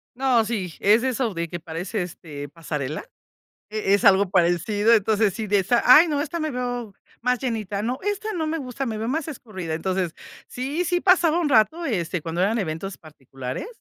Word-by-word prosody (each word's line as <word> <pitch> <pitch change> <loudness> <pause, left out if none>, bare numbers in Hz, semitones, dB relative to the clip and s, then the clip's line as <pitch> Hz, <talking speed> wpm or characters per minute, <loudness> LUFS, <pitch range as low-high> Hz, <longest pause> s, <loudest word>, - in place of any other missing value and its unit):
No, 250 -3 +3
sí, 195 -7 -3
es 215 +4 +4
eso 255 -4 0
de 170 -1 -3
que 175 +1 -6
parece, 170 +6 -4
este, 150 -5 -7
pasarela. 150 -3 -4 0.7
E 210 -2 +1
es 205 - +1
algo 200 -1 +5
parecido, 195 +5 +2
entonces, 215 -1 +3
sí 220 +1 -4
de 205 0 +3
esa: 235 +6 +2
"Ay, 300 +7 +8
no, 295 -2 0
esta 325 +3 -3
me 310 0 -1
veo 245 -4 -4 0.3
más 250 +1 +1
llenita". 215 -5 -3
"No, 245 +4 -2
esta 415 +2 -2
no 325 -5 -2
me 320 +1 -1
gusta, 265 -1 -4
me 220 -2 -3
veo 225 - -3
más 310 +4 -2
escurrida". 190 - -6
Entonces, 185 0 -2 0.3
sí, 280 +8 -3
sí 355 0 +1
pasaba 345 -4 +4
un 320 - +1
rato, 275 +8 +3
este, 180 - -1
cuando 165 +3 -2
eran 220 +4 +2
eventos 185 +1 -4
particulares, 135 - -7
215 Hz, 190 wpm, -24 LUFS, 180-260 Hz, 0.7 s, Ay